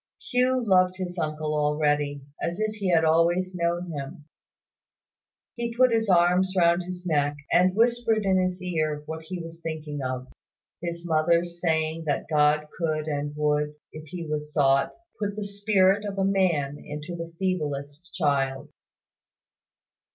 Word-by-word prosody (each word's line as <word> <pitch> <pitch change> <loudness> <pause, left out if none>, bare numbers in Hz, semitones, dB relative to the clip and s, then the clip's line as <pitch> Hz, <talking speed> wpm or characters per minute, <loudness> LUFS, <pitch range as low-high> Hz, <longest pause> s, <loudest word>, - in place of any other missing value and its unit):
Hugh 255 0 +2
loved 185 -2 +4
his 180 -1 -4
uncle 155 -1 -2
already, 150 -1 +1 0.2
as 170 +3 -2
if 215 0 0
he 205 -3 -2
had 165 -2 +4
always 170 +3 +2
known 175 0 -1
him. 145 0 -7 1.3
He 235 -1 -3
put 255 0 +5
his 225 -2 +1
arms 180 +1 +4
round 170 0 +4
his 180 0 -7
neck, 145 -3 +1 0.2
and 185 +1 +4
whispered 230 -2 +2
in 190 -1 +3
his 185 0 -1
ear 155 -4 -1
what 160 +1 -6
he 180 +3 -6
was 165 0 -9
thinking 155 -3 -5
of; 130 0 -3 0.5
his 170 0 -5
mother's 170 +1 +1
saying 160 -1 0
that 145 -2 -1
God 150 0 +3
could 155 -3 -1
and 145 -1 -3
would, 150 0 0 0.2
if 155 0 -9
He 170 +2 -6
was 150 -1 -4
sought, 140 -2 +3 0.3
put 205 -1 -2
the 210 - -4
spirit 200 -1 +2
of 200 -1 -5
a 195 - +2
man 170 -8 +1
into 150 +4 -6
the 165 0 -6
feeblest 150 -3 -3
child. 135 -5 0
170 Hz, 150 wpm, -26 LUFS, 150-185 Hz, 1.3 s, put